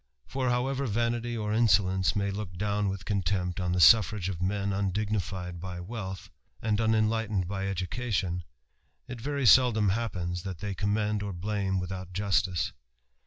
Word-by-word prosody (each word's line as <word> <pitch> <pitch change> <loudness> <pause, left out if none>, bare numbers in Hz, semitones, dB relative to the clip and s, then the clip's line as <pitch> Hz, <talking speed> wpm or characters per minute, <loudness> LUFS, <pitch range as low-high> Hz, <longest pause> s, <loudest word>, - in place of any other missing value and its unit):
For, 130 -1 -1
however 130 +3 0
vanity 120 +1 -1
or 105 -1 -2
insolence 95 -4 +3
may 100 -1 0
look 100 -3 -6
down 105 +1 0
with 95 -1 -5
contempt 95 -2 -1
on 90 -1 0
the 90 - 0
suffrage 105 -1 +6
of 90 -3 -5
men 100 +2 0
imdignified 95 -3 -2
by 90 0 -6
wealth, 95 -1 -6 0.3
and 110 -1 0
unenlightened 110 -3 +1
by 95 +1 -3
education, 95 -1 -2 0.6
it 125 -2 -7
very 140 +1 -1
seldom 115 -3 +6
happens 90 -5 -2
that 95 -2 -5
they 100 +3 -4
commend 105 +2 0
or 100 -1 -4
blame 95 +1 -1
without 90 0 -6
justice. 95 -2 0
100 Hz, 150 wpm, -29 LUFS, 95-110 Hz, 0.6 s, suffrage